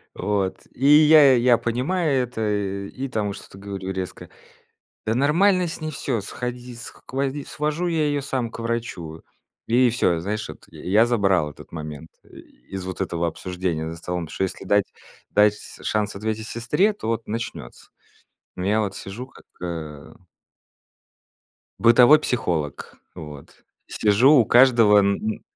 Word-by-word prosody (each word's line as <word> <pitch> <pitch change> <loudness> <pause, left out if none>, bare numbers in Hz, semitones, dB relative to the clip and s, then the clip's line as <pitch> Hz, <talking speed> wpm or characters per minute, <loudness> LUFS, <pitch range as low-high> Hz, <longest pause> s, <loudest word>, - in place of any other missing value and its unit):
Вот. 100 -2 -2
И 135 +3 -1
я 150 -2 +7
я 120 -1 +4
понимаю 135 +4 0
это 125 -2 -7 0.5
и 135 +5 -6
там 105 -4 -2
что-то 95 - -12
говорю 95 -1 -5
резко: 95 -1 -6 0.8
"Да 110 - 0
нормально 175 +7 +3
с 165 - -6
ней 155 - -3
всё! 130 -5 -2
Сходи 125 +3 -6
скводи 135 +4 -5
свожу 155 +4 -2
я 160 -3 +1
её 145 -1 0
сам 130 -4 -3
к - - -9
врачу!" 115 -9 -4 0.5
И 125 +2 +4
всё, 90 -7 +1
знаешь 105 +5 -3
вот, - - -11
я - - -13
я 105 +5 +4
забрал 95 -9 +2
этот 70 - -14
момент 75 -1 -7
и - - -17 0.4
из 95 -1 -5
вот 95 +1 -5
этого 85 -2 -1
обсуждения 85 -1 -3
за 80 - -7
столом, 90 0 -4
что 95 - -3
если 95 - -4
дать 100 +1 +1 0.4
дать 105 0 +4 0.2
шанс 105 -2 -1
ответить 110 +2 -3
сестре, 150 - +1
то 200 - -7
вот 115 0 -2
начнется. 110 - -6 0.7
Я 100 +4 +1
вот 100 -2 -2
сижу 110 +7 -7
как, - - -19 0.2
э 80 -4 -6 1.6
бытовой 120 +6 +7
психолог, 85 - -2 0.2
вот. 75 -3 -11 0.2
Сижу 110 +7 +4
у 125 -6 +6
каждого 120 -3 +6
н 100 0 +3
м, 110 0 -4
110 Hz, 150 wpm, -23 LUFS, 95-130 Hz, 1.6 s, я